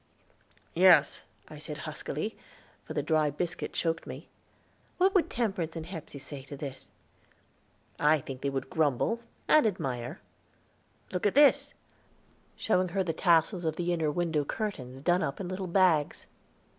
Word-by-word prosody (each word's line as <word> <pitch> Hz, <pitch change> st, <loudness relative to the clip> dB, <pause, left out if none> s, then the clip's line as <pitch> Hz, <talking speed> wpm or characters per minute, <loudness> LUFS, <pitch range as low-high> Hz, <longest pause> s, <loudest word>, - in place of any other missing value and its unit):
"Yes," -, -, +5 dB, 0.3 s
I -, -, -10 dB
said -, -, -6 dB
huskily, -, -, -4 dB, 0.5 s
for 155 Hz, -, -7 dB
the 145 Hz, -, 0 dB
dry 155 Hz, -1 st, +2 dB
biscuit 165 Hz, +4 st, -3 dB
choked 165 Hz, -1 st, -1 dB
me. -, -, -9 dB, 0.7 s
"What 380 Hz, +2 st, +3 dB
would 375 Hz, -, +3 dB
Temperance 195 Hz, -9 st, -2 dB
and 160 Hz, -1 st, -5 dB
Hepsey 165 Hz, -5 st, -8 dB
say 140 Hz, 0 st, -8 dB
to 140 Hz, +1 st, -9 dB
this?" 135 Hz, -2 st, -7 dB, 1.1 s
"I 150 Hz, +1 st, +4 dB
think 130 Hz, -1 st, -8 dB
they 140 Hz, -, 0 dB
would 135 Hz, -1 st, -3 dB
grumble, 160 Hz, -, +1 dB, 0.3 s
and 305 Hz, -7 st, +6 dB
admire. 130 Hz, -, -3 dB, 0.9 s
Look 180 Hz, +2 st, 0 dB
at 205 Hz, -, -1 dB
this," 285 Hz, -1 st, +5 dB, 0.8 s
showing 185 Hz, -4 st, +1 dB
her 190 Hz, +2 st, 0 dB
the 165 Hz, -3 st, -2 dB
tassels 170 Hz, +3 st, +3 dB
of 160 Hz, -1 st, -1 dB
the 175 Hz, +1 st, -1 dB
inner 160 Hz, -3 st, 0 dB
window 160 Hz, -1 st, 0 dB
curtains 135 Hz, -, -5 dB
done 175 Hz, +2 st, +3 dB
up 140 Hz, -7 st, -2 dB
in 190 Hz, -, -4 dB
little 185 Hz, +1 st, -4 dB
bags. 170 Hz, -5 st, +2 dB
165 Hz, 150 wpm, -29 LUFS, 145-185 Hz, 1.1 s, and